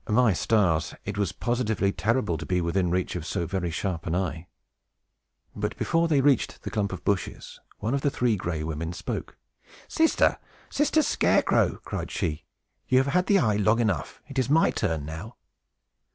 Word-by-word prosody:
My 110 0 +4
stars! 85 -5 +1
it 100 - -4
was 100 -3 0
positively 110 -4 0
terrible 105 -3 0
to - - -6
be 90 -1 +1
within 90 +1 0
reach 90 +1 -1
of - - -3
so 85 - -2
very 90 0 -2
sharp 85 -1 -3
an 85 - 0
eye! 90 -2 -2 1.1
But, - - -3
before 165 0 +1
they 150 -4 +3
reached 135 -3 +1
the - - -5
clump 105 -3 -1
of 95 - -6
bushes, 100 -2 -2 0.2
one 115 +5 -2
of 140 - 0
the 145 - +2
Three 125 -4 +1
Gray 85 -5 -3
Women 80 +2 -3
spoke. - - -5 0.5
"Sister! 320 0 +2 0.3
Sister 305 +2 +2
Scarecrow!" - - +2
cried - - -4
she, 75 -1 -3 0.4
"you 130 - +3
have 135 +2 +2
had 180 +1 +2
the 200 - +5
eye 110 - +2
long 105 +3 +3
enough. 105 -6 -1
It 140 -1 -3
is 130 - 0
my 160 +3 +4
turn 80 -8 -1
now!" 85 +10 -7
105 Hz, 180 wpm, -26 LUFS, 85-125 Hz, 1.1 s, the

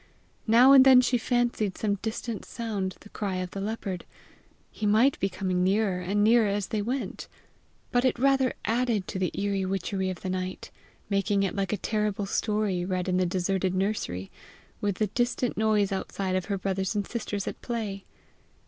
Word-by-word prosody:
Now 240 +4 +7
and 270 -1 +9
then 260 -1 +8
she 250 -1 +1
fancied 235 -4 0
some 205 -2 -1
distant 225 0 -4
sound 205 -5 -4
the 210 - -14
cry 200 -3 -3
of 185 0 -3
the 195 - -5
leopard: 200 -3 -4 0.7
he 215 - -2
might 225 +7 +4
be 195 - +1
coming 185 -1 -1
nearer 195 -1 +1
and 200 +3 0
nearer 225 0 +5
as 200 -1 -1
they 215 -3 -1
went! 250 +6 -3 0.6
but 245 0 +2
it 255 - +2
rather 270 0 +2
added 230 -4 0
to 190 - -3
the 185 - +1
eerie 200 -1 0
witchery 190 0 -2
of 185 -3 -6
the 190 - -4
night, 185 0 -4 0.4
making 200 0 +1
it 190 - -1
like 195 -1 -1
a 210 - 0
terrible 210 -1 -1
story 210 -3 0
read 185 0 -2
in 185 -1 +1
the 185 -1 +2
deserted 185 +1 0
nursery, 185 - -2 0.5
with 205 -2 0
the 215 - +1
distant 240 +3 -1
noise 215 -2 +2
outside 190 -1 -2
of 185 -1 -1
her 200 -2 -2
brothers 190 +1 -2
and 205 -1 0
sisters 205 -3 -4
at - - -5
play. 215 -5 -4
205 Hz, 185 wpm, -27 LUFS, 190-225 Hz, 0.7 s, and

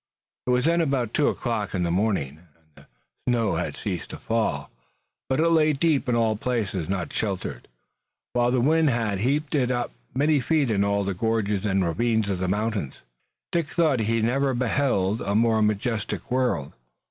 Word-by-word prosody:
It - - 0
was 125 +1 +2
then 170 +1 +3
about 135 -7 0
two 150 - +3
o'clock 110 -5 -2
in 90 - 0
the 85 - 0
morning, 90 -7 0 0.2
and 80 -1 -34
the - - -19 0.4
snow 115 -4 +1
had - - -3
ceased - - -4
to - - -7
fall, 115 -1 -1 0.6
but 130 +2 +1
it 165 - +4
lay 155 -2 +4
deep 145 -2 +1
in 120 - +2
all 115 -2 +2
places 105 -7 -2
not 95 -3 -2
sheltered, 95 - -3 0.7
while 120 0 +2
the 125 0 +2
wind 155 +3 +3
had 115 -6 0
heaped 140 +7 0
it 130 -5 +2
up 120 -1 -1 0.2
many 145 +2 +3
feet 140 -1 +1
in 100 -2 +2
all 100 0 +1
the 100 0 -1
gorges 105 0 0
and 95 -2 +1
ravines 110 +4 +1
of 95 - -2
the 95 - -1
mountains. 105 -6 -1 0.6
Dick 170 -4 0
thought 155 -7 +2
he 110 +1 +1
had 110 -1 +1
never 135 +2 +1
beheld 120 -4 +1
a 100 - -1
more 110 0 +3
majestic 105 +4 -1
world. 125 - 0
115 Hz, 185 wpm, -25 LUFS, 100-130 Hz, 0.7 s, it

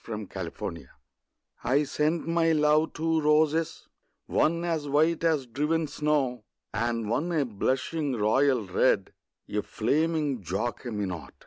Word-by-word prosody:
The 110 -2 -5
White 105 -3 -6
Flag 85 -5 -5 0.8
I 135 +5 +3
sent 155 +3 -1
my 165 -1 +3
love 150 +1 +3
two 160 0 0
roses, 155 +1 +2 0.4
one 170 +2 +1
As 160 -4 -1
white 160 +4 +2
as 155 -5 +2
driven 150 +7 0
snow, 140 -4 0 0.3
And 115 0 -1
one 145 +10 -1
a 155 -4 +1
blushing 130 +6 -1
royal 120 +2 +2
red, 95 +1 +1 0.3
A 105 - -1
flaming 150 +3 0
Jacqueminot. 100 -1 -4
145 Hz, 125 wpm, -27 LUFS, 115-160 Hz, 0.8 s, I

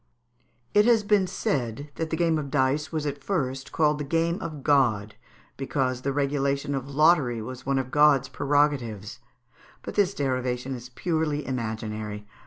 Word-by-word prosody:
It 210 0 +5
has 230 -3 +4
been 205 -2 +3
said 140 -4 -2
that 165 -1 -3
the 160 - -2
game 165 -2 +2
of 140 -2 -5
dice 140 +2 +1
was 155 -2 -2
at 140 -1 -4
first 135 -8 -2
called 150 -2 +2
the - - -2
game 165 +4 0
of 155 -4 -6
God, 115 -8 +2 0.4
because 130 -3 -1
the 140 - -1
regulation 140 0 0
of 135 0 -3
lottery 145 -5 +3
was 130 +4 -8
one 135 0 +2
of 130 -1 -2
God's 145 -3 +5
prerogatives; 130 -7 0 0.6
but - - -6
this 200 -2 +2
derivation 130 -1 -1
is 125 -1 -8
purely 150 0 -1
imaginary. 110 -4 -4
140 Hz, 160 wpm, -26 LUFS, 130-155 Hz, 0.6 s, It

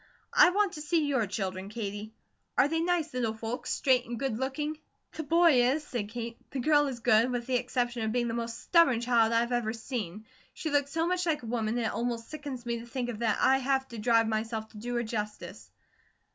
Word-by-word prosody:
I - - +7
want 400 +1 +1
to 300 - -6
see 315 0 +1
your 265 -7 +1
children, 190 -1 -4
Katie. 210 -1 -5 0.5
Are - - +5
they 325 +2 0
nice 335 -2 0
little 235 -3 -1
folks, 225 +2 -4
straight 255 -3 +2
and 240 0 -4
good 245 -2 -2
looking?" 295 +4 -2 0.3
"The - - -4
boy 325 -3 +5
is," 280 +5 +1
said 230 -7 -4
Kate. 230 0 -5
"The 270 - -4
girl 295 +2 +4
is 250 -4 -5
good, 225 +1 +4
with 245 -1 -2
the 255 0 +1
exception 245 -1 -1
of 220 0 -1
being 240 0 0
the 230 - -2
most 235 0 -4
stubborn 305 -9 +4
child 235 -2 +3
I've 235 +1 +2
ever 235 -3 0
seen. 220 -4 -5 0.3
She 315 - -3
looks 285 -1 +1
so 325 +2 0
much 360 0 0
like 305 -5 0
a - - -7
woman 225 0 -1
it 230 -2 -1
almost 230 0 -3
sickens 285 -5 -6
me 235 -1 -2
to 235 - -10
think 245 0 -3
of 225 -3 -5
that 225 -3 +1
I 265 +1 +5
have 265 0 0
to 235 - -7
drive 230 0 +3
myself 220 0 -2
to - - -14
do 240 +3 -4
her 240 - +1
justice." 210 -2 -5
240 Hz, 225 wpm, -29 LUFS, 225-280 Hz, 0.5 s, I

